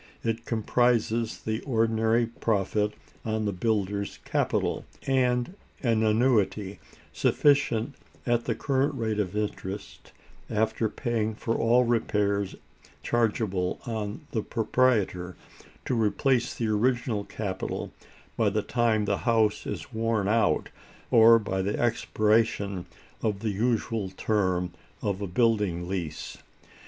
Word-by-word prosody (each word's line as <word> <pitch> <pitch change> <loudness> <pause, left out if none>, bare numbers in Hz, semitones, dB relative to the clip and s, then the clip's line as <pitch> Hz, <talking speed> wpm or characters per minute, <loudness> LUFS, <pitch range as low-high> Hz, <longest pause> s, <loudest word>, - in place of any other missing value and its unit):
It 115 +1 -2
comprises 115 0 +1
the 110 +1 -2
ordinary 115 -2 +2
profit 105 -2 0 0.3
on 110 -1 -1
the 100 - +1
builder's 100 0 -1
capital, - - 0 0.2
and 125 +2 +1 0.3
an 115 -3 +2
annuity, 110 -3 +2 0.3
sufficient 140 -4 +2 0.3
at 120 -1 +1
the - - 0
current 140 +1 0
rate 110 -4 -1
of 105 0 -1
interest, 100 -1 -5 0.4
after 110 +1 0
paying 110 -2 -2
for 115 +1 -2
all 120 +2 +4
repairs 105 -4 0 0.5
chargeable 105 -6 0
on 110 +1 -4
the 110 - 0
proprietor, 105 -7 +1 0.5
to - - -1
replace 120 +2 +1
the 115 - -1
original 110 0 +1
capital 95 -3 -4 0.4
by 110 -2 +2
the 105 +1 -1
time 115 -3 +1
the 100 -1 +1
house 110 -2 +2
is - - -6
worn 110 -2 0
out, 110 0 +2 0.4
or 115 0 +8
by 95 -3 -2
the 100 +2 -1
expiration 105 -4 +1 0.3
of 105 -3 -1
the 110 -2 0
usual 110 -1 0
term 95 -3 0 0.3
of 100 -1 -1
a 100 - -2
building 100 -4 +1
lease. 85 -5 -4
110 Hz, 120 wpm, -27 LUFS, 100-115 Hz, 0.5 s, or